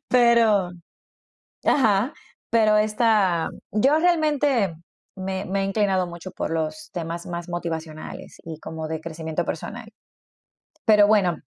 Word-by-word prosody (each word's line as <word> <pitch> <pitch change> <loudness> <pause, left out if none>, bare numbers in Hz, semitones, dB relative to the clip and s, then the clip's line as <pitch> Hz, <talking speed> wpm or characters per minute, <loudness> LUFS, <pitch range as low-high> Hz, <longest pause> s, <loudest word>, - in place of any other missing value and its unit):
Pero 230 -6 +4 0.9
Ajá. 225 0 +3 0.4
Pero 215 -2 +4
esta 210 -5 +2 0.2
Yo 270 +9 +3
realmente 295 - +2 0.4
me 190 +1 -3
me 195 +1 -1
he - - 0
inclinado 195 -2 +1
mucho 175 +2 -8
por 175 - -4
los 165 - -3
temas 170 -1 -5
más 175 0 -5
motivacionales 160 -2 -6
y 160 -2 -7
como 160 -1 -6
de 160 0 -4
crecimiento 160 +1 -4
personal. 220 +7 -6 0.9
Pero 210 -2 +6
bueno, 195 -5 +3
195 Hz, 120 wpm, -24 LUFS, 170-225 Hz, 0.9 s, Pero